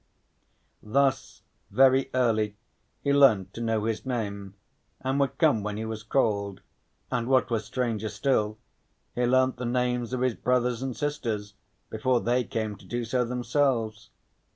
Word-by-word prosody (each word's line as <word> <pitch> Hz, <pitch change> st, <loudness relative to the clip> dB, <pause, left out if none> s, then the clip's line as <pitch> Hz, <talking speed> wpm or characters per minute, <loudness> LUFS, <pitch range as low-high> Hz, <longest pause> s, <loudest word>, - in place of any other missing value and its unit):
Thus 135 Hz, +4 st, 0 dB, 0.3 s
very 130 Hz, +4 st, +4 dB
early 110 Hz, -4 st, +1 dB, 0.5 s
he 140 Hz, -, +2 dB
learnt 125 Hz, -10 st, +4 dB
to 115 Hz, -, -6 dB
know 115 Hz, -2 st, 0 dB
his 110 Hz, -1 st, -2 dB
name, 100 Hz, -6 st, -4 dB, 0.5 s
and 130 Hz, +2 st, 0 dB
would 135 Hz, -1 st, 0 dB
come 145 Hz, -9 st, +3 dB
when 105 Hz, 0 st, -4 dB
he 110 Hz, -, -3 dB
was 110 Hz, -1 st, -5 dB
called, 100 Hz, -5 st, 0 dB, 0.5 s
and 120 Hz, -1 st, -1 dB
what 130 Hz, -1 st, +2 dB
was 110 Hz, -2 st, 0 dB
stranger 110 Hz, -2 st, -2 dB
still, 110 Hz, -1 st, 0 dB, 0.6 s
he 125 Hz, 0 st, 0 dB
learnt 130 Hz, 0 st, +3 dB
the 125 Hz, -, -4 dB
names 125 Hz, -1 st, 0 dB
of 130 Hz, -1 st, -2 dB
his 130 Hz, -2 st, +2 dB
brothers 125 Hz, 0 st, 0 dB
and 130 Hz, -2 st, -4 dB
sisters 115 Hz, -9 st, -3 dB, 0.4 s
before 120 Hz, +3 st, +1 dB
they 125 Hz, +2 st, +1 dB
came 110 Hz, -1 st, -3 dB
to -, -, -17 dB
do 120 Hz, 0 st, -3 dB
so 125 Hz, +2 st, +1 dB
themselves. 120 Hz, -2 st, -1 dB
120 Hz, 150 wpm, -27 LUFS, 110-130 Hz, 0.6 s, very